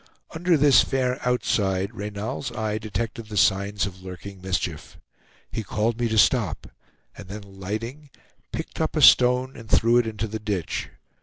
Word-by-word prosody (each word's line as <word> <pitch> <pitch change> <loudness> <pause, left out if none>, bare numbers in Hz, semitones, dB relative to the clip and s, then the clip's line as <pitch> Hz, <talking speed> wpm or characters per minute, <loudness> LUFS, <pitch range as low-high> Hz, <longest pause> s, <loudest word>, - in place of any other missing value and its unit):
Under 170 +1 +2
this 140 -3 +6
fair 130 -1 -1
outside, 100 -5 0
Reynal's 105 +5 -4
eye 110 -1 -2
detected 110 +1 -4
the 105 -1 -5
signs 100 +1 +2
of 95 -1 -8
lurking 95 +1 -9
mischief. 90 -4 -3 0.5
He 110 - -3
called 110 +4 -1
me 120 - +1
to 110 0 -1
stop, 105 - +3 0.5
and 100 - -11
then 105 +2 -7
alighting, 110 +9 -6 0.4
picked - - -5
up - - -1
a - - +1
stone 125 +1 +6
and 115 -2 -11
threw 115 +1 +4
it 120 -2 +2
into 110 -1 -3
the 110 0 -5
ditch. 100 -5 -3
110 Hz, 160 wpm, -24 LUFS, 100-120 Hz, 0.5 s, this